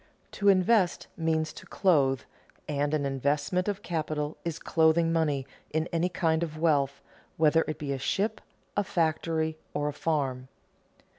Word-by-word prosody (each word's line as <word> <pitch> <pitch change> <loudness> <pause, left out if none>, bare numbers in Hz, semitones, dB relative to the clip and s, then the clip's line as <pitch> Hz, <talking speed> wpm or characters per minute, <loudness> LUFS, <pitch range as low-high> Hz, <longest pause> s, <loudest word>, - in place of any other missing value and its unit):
To 200 -1 +2
invest 190 0 +3
means 160 -1 0
to - - -12
clothe, 140 - +2 0.5
and 145 +1 0
an 145 -2 -1
investment 145 +6 0
of 205 0 -2
capital 155 -2 -2
is 170 -2 -3
clothing 165 +1 +3
money 150 -5 +1 0.2
in 160 +2 -1
any 170 +2 +1
kind 165 -3 +1
of 155 -2 -3
wealth, 140 -4 +1 0.3
whether 160 +1 +4
it 155 - -3
be 140 -2 -3
a 135 - -4
ship, 205 +10 -1 0.3
a 205 - +2
factory, 160 -2 0 0.2
or 145 0 0
a - - -5
farm. 135 -5 -1
160 Hz, 150 wpm, -28 LUFS, 145-170 Hz, 0.5 s, whether